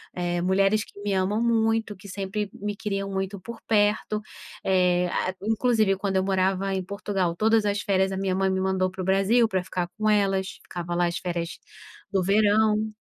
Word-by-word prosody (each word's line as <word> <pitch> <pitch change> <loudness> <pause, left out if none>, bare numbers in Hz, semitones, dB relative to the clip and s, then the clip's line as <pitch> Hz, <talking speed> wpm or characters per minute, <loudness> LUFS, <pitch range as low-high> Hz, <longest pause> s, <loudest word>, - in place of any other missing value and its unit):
eh, 175 -1 -1
mulheres 195 +3 +3
que - - -15
me 205 -1 -1
amam 195 +4 +1
muito, 225 -2 +1
que 195 +1 -13
sempre 200 +2 -3
me 205 0 -4
queriam 195 -1 -3
muito 195 0 -3
por 235 +4 -8
perto, 210 0 +2 0.4
eh, 180 -1 +2
a 185 - -1
inclusive 220 -2 +2
quando 195 -1 -1
eu 190 - +2
morava 190 0 +1
em 190 - -2
Portugal, 190 -2 -2
todas 220 +2 +3
as 205 0 0
férias 190 -1 +1
a 190 - -3
minha 190 -1 0
mãe 190 0 +1
me 190 0 0
mandou 190 -1 0
para 190 0 -6
o - - -3
Brasil 195 +5 +3
pra 190 -4 -1
ficar 180 -1 -3
com 215 0 0
elas, 195 -2 +1
ficava 175 0 -5
lá 175 0 +2
as 170 - -2
férias 170 -2 -4 0.5
do 195 -2 +2
verão 215 +2 +3
195 Hz, 195 wpm, -25 LUFS, 185-210 Hz, 0.5 s, mulheres